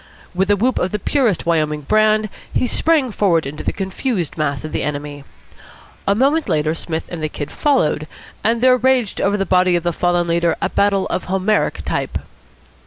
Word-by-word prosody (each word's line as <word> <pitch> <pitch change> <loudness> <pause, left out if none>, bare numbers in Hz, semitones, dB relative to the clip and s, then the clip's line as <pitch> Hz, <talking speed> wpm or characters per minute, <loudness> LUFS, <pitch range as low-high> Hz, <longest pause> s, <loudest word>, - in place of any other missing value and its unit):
With 190 +2 0
a 205 - +5
whoop 245 +6 +1
of 180 - 0
the 210 - -2
purest 230 - 0
Wyoming 155 -3 0
brand, 215 +5 +2 0.2
he - - +1
sprang 290 0 +2
forward 180 -6 +2
into 145 +2 -6
the - - 0
confused 190 - -3
mass 145 -3 -2
of 155 - -6
the - - -2
enemy. 145 -1 -5 0.8
A 200 - +3
moment 285 +7 +2
later 155 +1 +1
Psmith 160 0 -4
and 170 -2 -5
the 155 - -1
Kid 145 -1 -6
followed, 160 - +1 0.4
and 230 +1 +1
there 255 0 +5
raged 255 -4 +1
over 200 +1 +1
the 195 - -1
body 180 -1 +3
of 170 - 0
the 175 -1 0
fallen 175 +1 +1
leader 170 0 +1
a - - -1
battle 200 -1 +1
of - - -2
Homeric 190 +3 0
type. - - -2
185 Hz, 190 wpm, -19 LUFS, 160-215 Hz, 0.8 s, a